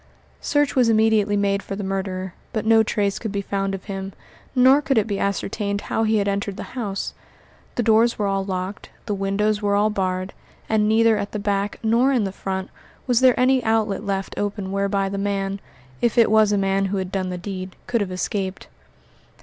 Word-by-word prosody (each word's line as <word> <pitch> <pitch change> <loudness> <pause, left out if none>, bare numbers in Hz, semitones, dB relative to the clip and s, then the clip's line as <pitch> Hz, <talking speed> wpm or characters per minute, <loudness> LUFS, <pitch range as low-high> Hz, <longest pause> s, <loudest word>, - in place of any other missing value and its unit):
Search 290 -1 +1
was 250 -3 +4
immediately 215 -2 +3
made 200 0 +1
for 195 - -6
the 200 - -5
murderer, 190 -1 -3 0.2
but 215 - -2
no 225 0 +6
trace 205 -2 0
could 220 - -4
be 200 0 -2
found 195 0 -2
of 190 - -9
him, 195 -1 -6 0.4
nor 260 +3 +6
could 275 -4 0
it 215 - +3
be 200 -3 -3
ascertained 200 +1 -2
how - - -2
he 220 0 +2
had 205 -1 0
entered 200 0 -2
the - - -8
house. 205 -6 -3 0.6
The 240 - 0
doors 225 +2 +4
were 210 - 0
all 195 -1 0
locked, 190 +1 -4 0.2
the 210 - -2
windows 205 +2 0
were 205 -1 +1
all 210 +1 +3
barred, 185 -1 -2 0.3
and 215 -1 +2
neither 225 0 +4
at 200 - -4
the - - -1
back 200 0 -1
nor 235 +5 +3
in 250 -5 +2
the 195 - -2
front 190 0 -4 0.3
was 245 -3 +3
there 255 -1 +4
any 255 0 +3
outlet 220 -3 +1
left 195 -2 -2
open 205 -1 -3
whereby 200 0 0
the 195 0 -3
man 195 0 -2 0.4
if 235 -1 +1
it 230 -2 +5
was 215 -1 +5
a 205 - +2
man 195 0 +1
who 195 +1 -1
had 190 -1 -3
done 190 -2 -2
the 180 - -4
deed 185 0 -6
could 235 -2 0
have 195 -2 -2
escaped. 190 +1 -3
200 Hz, 205 wpm, -22 LUFS, 195-220 Hz, 0.6 s, no